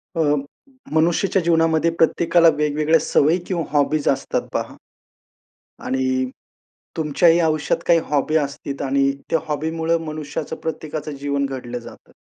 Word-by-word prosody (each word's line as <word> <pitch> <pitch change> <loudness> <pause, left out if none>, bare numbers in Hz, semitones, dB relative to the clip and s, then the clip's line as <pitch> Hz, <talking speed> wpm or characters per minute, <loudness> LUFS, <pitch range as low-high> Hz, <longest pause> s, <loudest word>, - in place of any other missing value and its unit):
अ, 165 - +1 0.7
मनुष्याच्या 175 +4 +2
जीवनामध्ये 165 -1 +2
प्रत्येकाला 170 +1 +4
वेगवेगळ्या 150 +2 +2
सवयी 155 +2 +2
किंवा 170 -4 -1
हॉबीज 145 +1 +1
असतात 135 0 -1
पहा - - -3 1.1
आणि 130 0 0 0.7
तुमच्याही 165 +2 +3
आयुष्यात 155 -2 +1
काही 170 -1 +5
हॉबी 150 +1 +1
असतील 140 -1 -3
आणि 135 0 +2 0.2
त्या 165 - +3
हॉबीमुळं 160 +2 -1
मनुष्याचं 155 -1 -5
प्रत्येकाचं 155 -1 -4
जीवन 140 0 -1
घडलं 125 -2 -5
जातं. 115 - -14
155 Hz, 115 wpm, -21 LUFS, 140-165 Hz, 1.1 s, काही